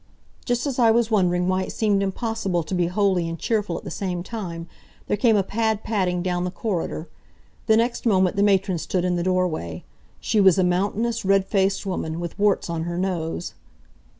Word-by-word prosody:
Just 245 +1 0
as 270 -3 -2
I 235 -2 +5
was 230 0 +2
wondering 180 -4 +2
why 185 0 +1
it - - -4
seemed 205 -3 +1
impossible 195 -3 -1
to 155 - -6
be 175 -2 +1
holy 185 -2 +1
and 165 - -5
cheerful 210 -3 -1
at - - -9
the - - -7
same 180 -3 -3
time, 175 -6 -6 0.4
there - - 0
came 225 +1 +3
a 200 - +2
pad 220 +1 -1
padding 180 -5 0
down 180 -1 -1
the 180 - -1
corridor. 175 -5 -3 0.6
The 220 - +5
next 235 +1 0
moment 190 -4 +3
the 200 - +1
matron 195 -3 +2
stood 180 +2 -1
in 180 -1 +1
the 175 - -1
doorway. 180 - -1 0.4
She 215 - 0
was 190 -1 +6
a 190 - +3
mountainous, 205 +6 0
red 195 0 +3
faced 195 0 0
woman, 165 -4 -3
with 175 +2 -6
warts 205 -1 +2
on 165 -1 -3
her 175 0 -3
nose. 175 -2 -2
190 Hz, 200 wpm, -23 LUFS, 175-210 Hz, 0.6 s, was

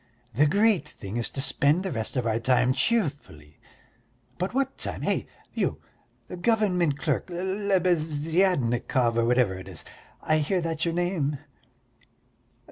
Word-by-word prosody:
The 145 +7 +4
great 205 +3 +3
thing 100 +3 -7
is 120 - -1
to 135 - -4
spend 145 +5 +2
the 190 - -3
rest 110 -3 -4
of 125 -2 0
our 115 0 +1
time 125 +2 +3
cheerfully; 140 - -2 0.8
but 185 +2 -1
what 270 +1 -1
time? - - -4
Hey, - - 0 0.3
you, - - -1 0.6
government 180 -9 +2
clerk, - - -1
Lebeziatnikov 170 - +1
or 115 0 +2
whatever 120 -4 +3
it 95 - -11
is, 90 -4 -8 0.4
I 155 0 +2
hear 170 +5 0
that's 165 -1 -2
your 170 -1 -1
name!" 175 -5 0
155 Hz, 135 wpm, -26 LUFS, 125-185 Hz, 0.8 s, The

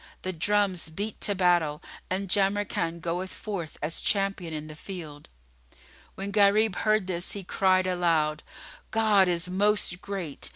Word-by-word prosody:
The 185 - -2
drums 190 -1 +1
beat 205 +6 -5
to 205 - +1
battle 175 -5 +2 0.3
and 195 +2 -1
Jamrkan 195 -4 +1
goeth 175 +3 -2
forth 185 -8 -6
as 155 +2 -1
champion 195 -4 0
in 155 -1 -5
the 155 - -9
field." 155 -3 -9 0.9
When 195 +1 -4
Gharib 205 0 +4
heard 215 -2 +2
this, 180 -1 -3
he 200 - -5
cried 185 0 +2
aloud, 165 -4 +1 0.5
"God 215 -4 +4
is 175 0 0
Most 195 -1 +1
Great!" 185 -8 -4
185 Hz, 140 wpm, -27 LUFS, 170-200 Hz, 0.9 s, Gharib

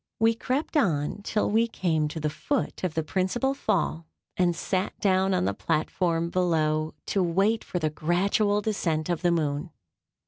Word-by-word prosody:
We 225 +1 +4
crept 260 +8 -2
on 175 - +1
till 210 +1 0
we 225 +2 +3
came 160 -8 0
to 155 +2 -5
the 155 - -1
foot 280 - -2
of 180 -4 -1
the 160 - 0
principal 195 - 0
Fall, 190 - -1 0.3
and 175 -2 +2
sat 185 +2 -2
down 190 -1 +2
on - - +1
the 100 - 0
platform 165 - 0
below, 155 -4 +1
to 195 - 0
wait 195 +6 +2
the 160 -4 0
gradual 200 +6 +1
descent 170 -7 -1
of 170 -2 -1
the 175 - +3
moon. 155 -1 0
180 Hz, 165 wpm, -27 LUFS, 160-205 Hz, 0.3 s, We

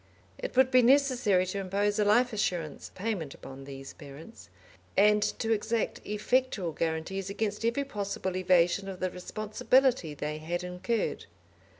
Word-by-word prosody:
It - - -5
would 260 0 +5
be 255 -1 +6
necessary 245 -7 +4
to 185 +2 -3
impose 200 +2 0
a - - +4
life 240 +4 +4
assurance 175 -7 -2
payment 185 -8 -3
upon 135 0 -10
these 135 -1 -9
parents, 150 +9 -12 0.5
and 210 +1 +5 0.2
to 225 -1 -1
exact 220 +1 -1
effectual 210 -3 0
guarantees 165 +5 -3
against 210 +1 -2
every 235 +5 +1
possible 200 -6 -3
evasion 185 +1 +2
of 185 -1 -7
the 185 -1 -1
responsibility 215 - +1
they 150 +2 -4
had 175 +3 -3
incurred. 180 +6 -2
200 Hz, 140 wpm, -29 LUFS, 175-225 Hz, 0.5 s, be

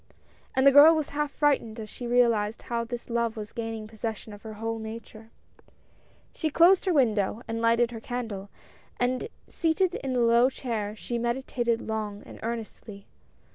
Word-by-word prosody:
And 265 - +3
the 275 - +9
girl 295 +4 +9
was 310 -2 -2
half 295 0 -1
frightened 275 -7 0
as 215 - -6
she 240 +3 -7
realized 235 -3 +2
how 235 -1 -2
this 240 +1 -6
love 235 -1 -1
was 210 -1 -7
gaining 225 -2 -5
possession 220 -1 -6
of 205 - -12
her 220 -1 -8
whole 225 +1 -4
nature. 220 0 -9 1.0
She 315 - -1
closed 345 +6 +5
her 375 - +2
window 225 -5 +1
and 225 0 -3
lighted 230 +1 +3
her 230 - -6
candle, 220 -5 -5 0.5
and 255 - 0 0.2
seated 345 +2 +1
in 260 -2 -3
a - - +2
low 235 +2 +5
chair 220 -6 -4
she 235 +2 -4
meditated 235 -1 -1
long 215 -2 -4
and - - -12
earnestly. 220 -3 -6
235 Hz, 170 wpm, -27 LUFS, 220-255 Hz, 1.0 s, the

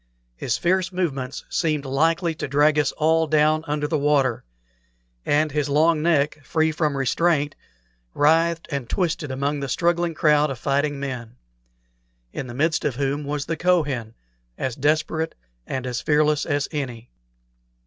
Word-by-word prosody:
His 110 - -1
fierce 185 - +1
movements 140 -8 -3
seemed 155 -4 -1
likely 165 +5 +1
to 155 - -5
drag 145 +2 +3
us 145 - +1
all 160 +1 +2
down 155 +1 +3
under 150 0 -1
the 155 0 0
water; 140 -4 +1 0.8
and 150 +1 +2
his 150 0 -1
long 155 +2 +3
neck, 150 -2 +1
free 160 +3 +1
from 150 -2 -1
restraint, 145 +2 +1 0.6
writhed 165 +2 +3
and 140 -4 -3
twisted 165 -5 -1
among 140 +2 -1
the 140 -1 -4
struggling 170 +3 +1
crowd 150 -1 +3
of 135 - -4
fighting 140 +2 0
men, 125 -4 -5 1.0
in 130 - -5
the 120 - -8
midst 155 +4 +1
of 140 - -1
whom 140 +2 -1
was 145 0 -3
the 165 - -2
Kohen, 145 -10 0 0.4
as 130 -3 -3
desperate 155 +3 0 0.3
and 130 -1 -3
as 125 -1 -3
fearless 150 0 +2
as 145 0 0
any. 125 -6 -5
150 Hz, 150 wpm, -23 LUFS, 140-160 Hz, 1.0 s, drag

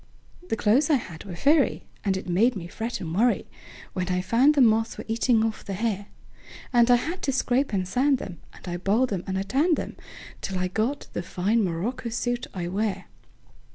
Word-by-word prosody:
The - - +1
clothes 235 +8 +3
I 305 - +5
had 175 - -5
were 185 -3 -7
furry, 285 - +3 0.2
And 195 -2 +1
it 190 - -7
made 220 +8 +3
me 180 -4 -5
fret 225 +6 -4
and 165 -1 -4
worryWhen 200 -4 -2
I 180 0 +1
found 240 +10 +4
the - - +3
moths 225 -1 +3
were - - -7
eating 225 0 +2
off 220 -1 -3
the 200 - -5
hair; 205 -1 -2 0.7
And 240 0 +5
I 245 - +8
had 325 +9 -2
to 275 - 0
scrape 265 0 +1
and 190 -3 -1
sand 265 +6 +2
'em, 175 -5 -7
And - - -14
I 175 0 -2
boiled 210 +6 +1
'em 180 -2 -2
and 190 0 -1
I 190 - 0
tanned 290 - +2
'em, - - -6 0.4
Till 190 - -3
I 180 0 -1
got 225 +9 -1
the - - -2
fine 200 +6 0
morocco 205 +8 -2
suit 245 +1 -2
I 175 -2 -4
wear. 200 +3 -2
220 Hz, 205 wpm, -26 LUFS, 185-245 Hz, 0.7 s, I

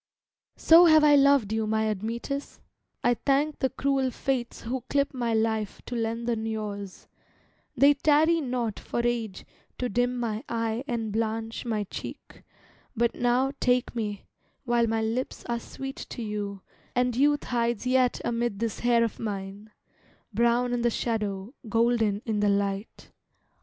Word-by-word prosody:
So 335 +2 +7
have 315 -2 +6
I 295 -1 +6
loved 280 -6 +4
you, 220 -1 0
my 220 0 +1
Admetus, 230 +7 -4 0.4
I 245 - +4
thank 280 +4 0
the 265 - +1
cruel 270 -1 0
fates 250 -1 -3
who 255 +3 -3
clip 280 0 +1
my 240 -3 -1
life 220 -2 0
To 245 - -5
lengthen 230 0 -2
yours, 205 -3 -5 0.7
they 280 +1 +7
tarry 310 +3 +3
not 245 -5 -2
for 235 - -3
age 230 -5 -2 0.3
To 250 - -2
dim 245 +3 0
my 225 -1 -2
eye 230 +1 -1
and 225 -3 -2
blanch 225 +2 -2
my 220 -3 -1
cheek, 200 - -9 0.5
but 235 0 +1
now 245 +2 +1
Take 250 -1 +1
me, 210 -3 -3 0.4
while 240 -2 +2
my 225 0 0
lips 230 +4 -3
are 235 -1 -2
sweet 270 +3 -7
to 240 - -5
you 205 -2 -4 0.3
And 250 -1 +1
youth 290 +3 +3
hides 235 -2 -1
yet 255 -1 +2
amid 235 -3 -1
this 225 0 -3
hair 240 -1 +3
of 230 - -3
mine, 200 0 -5 0.6
Brown 240 +1 +2
in 240 - 0
the 240 - +3
shadow, 215 -2 -2 0.2
golden 225 -2 +2
in 220 -2 -1
the 205 0 +3
light. 200 +1 -2
235 Hz, 150 wpm, -27 LUFS, 220-250 Hz, 0.7 s, So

